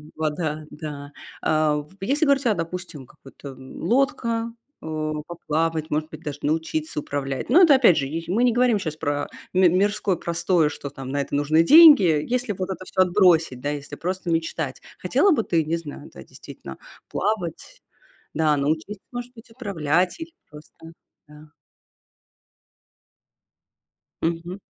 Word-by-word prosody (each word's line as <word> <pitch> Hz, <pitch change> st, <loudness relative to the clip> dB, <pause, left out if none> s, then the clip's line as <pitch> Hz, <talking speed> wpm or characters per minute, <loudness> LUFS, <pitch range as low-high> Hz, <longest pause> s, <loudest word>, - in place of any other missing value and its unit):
вода, 155 Hz, 0 st, -3 dB
да. 145 Hz, -2 st, -8 dB, 0.3 s
А 155 Hz, -1 st, +2 dB
в 150 Hz, +4 st, -8 dB
если 285 Hz, +10 st, +1 dB
говорить 280 Hz, -2 st, +2 dB
о, 215 Hz, -, +2 dB
допустим, 165 Hz, -4 st, -6 dB
какой-то, 135 Hz, +2 st, -13 dB
м, 130 Hz, 0 st, -12 dB
лодка, 230 Hz, -2 st, 0 dB, 0.3 s
а, 155 Hz, -1 st, -3 dB, 0.2 s
поплавать, 160 Hz, -1 st, -2 dB
может 155 Hz, +1 st, -1 dB
быть, 155 Hz, 0 st, -11 dB
даже 145 Hz, -2 st, -5 dB
научиться 155 Hz, 0 st, -2 dB
управлять. 135 Hz, -2 st, -4 dB
Но 345 Hz, +8 st, +7 dB
это, 315 Hz, -6 st, +7 dB
опять 235 Hz, -10 st, +5 dB
же, 140 Hz, -2 st, -1 dB
й 165 Hz, +4 st, -5 dB
мы 215 Hz, +7 st, +1 dB
не 245 Hz, -, +4 dB
говорим 245 Hz, -3 st, +3 dB
щас 155 Hz, -5 st, -4 dB
про 145 Hz, -2 st, -2 dB, 0.3 s
ми 185 Hz, -1 st, +5 dB
мирское 200 Hz, +1 st, +1 dB
простое, 170 Hz, -1 st, +1 dB
что 145 Hz, -1 st, -7 dB
там 135 Hz, -2 st, -9 dB
на 140 Hz, +1 st, -1 dB
это 140 Hz, -, -4 dB
нужны 150 Hz, +3 st, +3 dB
деньги. 305 Hz, -, +9 dB, 0.2 s
Если 250 Hz, -2 st, -1 dB
вот 185 Hz, 0 st, -4 dB
это 185 Hz, 0 st, -6 dB
всё 185 Hz, -, 0 dB
отбросить, 175 Hz, -8 st, +3 dB
да, 145 Hz, -, -2 dB
если 145 Hz, 0 st, -5 dB
просто 180 Hz, +1 st, -3 dB
мечтать, 165 Hz, 0 st, -2 dB, 0.2 s
хотела 405 Hz, -, +2 dB
бы 225 Hz, -8 st, +2 dB
ты, 165 Hz, -2 st, +1 dB
не 165 Hz, +2 st, -1 dB
знаю, 150 Hz, -3 st, -9 dB
да, -, -, -12 dB
действительно, 65 Hz, -, -11 dB, 0.3 s
плавать? 180 Hz, -7 st, -3 dB, 0.5 s
Да, 155 Hz, -2 st, +2 dB
научиться, 160 Hz, +8 st, -2 dB
может 245 Hz, 0 st, -6 dB
быть, 225 Hz, 0 st, -15 dB
управлять, 185 Hz, -, -1 dB
или 325 Hz, 0 st, -8 dB, 0.2 s
просто, 150 Hz, 0 st, -14 dB, 0.5 s
да? 150 Hz, 0 st, -16 dB, 2.7 s
Мгм. 170 Hz, +2 st, -3 dB
165 Hz, 155 wpm, -23 LUFS, 150-200 Hz, 2.7 s, деньги